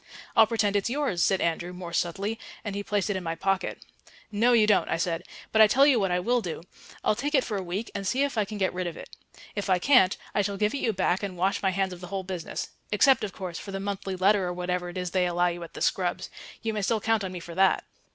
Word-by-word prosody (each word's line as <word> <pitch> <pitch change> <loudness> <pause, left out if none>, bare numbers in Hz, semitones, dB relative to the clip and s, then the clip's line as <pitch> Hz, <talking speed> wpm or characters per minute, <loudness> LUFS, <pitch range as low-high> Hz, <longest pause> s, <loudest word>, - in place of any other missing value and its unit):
"I'll 225 -2 +7
pretend 215 -3 +1
it's 205 +3 +1
yours," 260 - 0
said 195 - +2
Andrew 170 +1 -1
more 180 -1 -8
subtly, 200 +7 -1 0.3
and 205 - -3
he 200 - -3
placed 205 0 -1
it - - -1
in 190 - -2
my 165 -1 -2
pocket. 195 +3 -1 0.5
"No, 225 +4 +3
you 225 -3 +6
don't," 210 -2 +3
I - - +1
said. 170 0 -1 0.3
"But 220 - +5
I 215 - +9
tell 270 +6 +5
you 275 -5 +5
what 195 -2 +1
I 180 0 +1
will 240 +6 +1
do. 165 -4 -5 0.4
I'll - - +3
take 285 +8 -1
it 265 - +4
for 215 - -4
a 195 - -1
week 185 +5 -4
and 200 -1 -3
see 260 +7 +2
if 285 -2 -1
I 215 - +2
can 210 +1 -6
get 190 -2 0
rid 180 0 -2
of 170 - -6
it. - - -11 0.4
If 205 -1 -3
I 185 - +4
can't, 210 -2 +4 0.2
I 205 - +2
shall 200 0 -2
give 210 +1 +1
it - - -1
you 230 - +1
back 185 -2 0
and 195 -3 -5
wash 190 +3 +1
my 195 - +2
hands 190 0 -1
of 175 - -11
the 180 - -7
whole 190 +1 -3
business 180 -3 -5 0.2
except, 255 +6 +4
of 205 - -2
course, 180 -3 -6
for 200 - -8
the 195 - -3
monthly 195 -1 -3
letter 195 +2 +3
or 180 - -2
whatever 180 0 -2
it 175 - -8
is 180 -1 -3
they 180 -1 +2
allow 175 0 +2
you 175 0 -5
at 170 - -9
the - - -7
Scrubbs. - - 0 0.3
You 225 -1 -1
may 210 - -2
still 220 +3 +1
count 225 0 +1
on 190 - -4
me 180 - -6
for 170 0 -9
that." 190 +2 +3
195 Hz, 280 wpm, -27 LUFS, 180-215 Hz, 0.5 s, I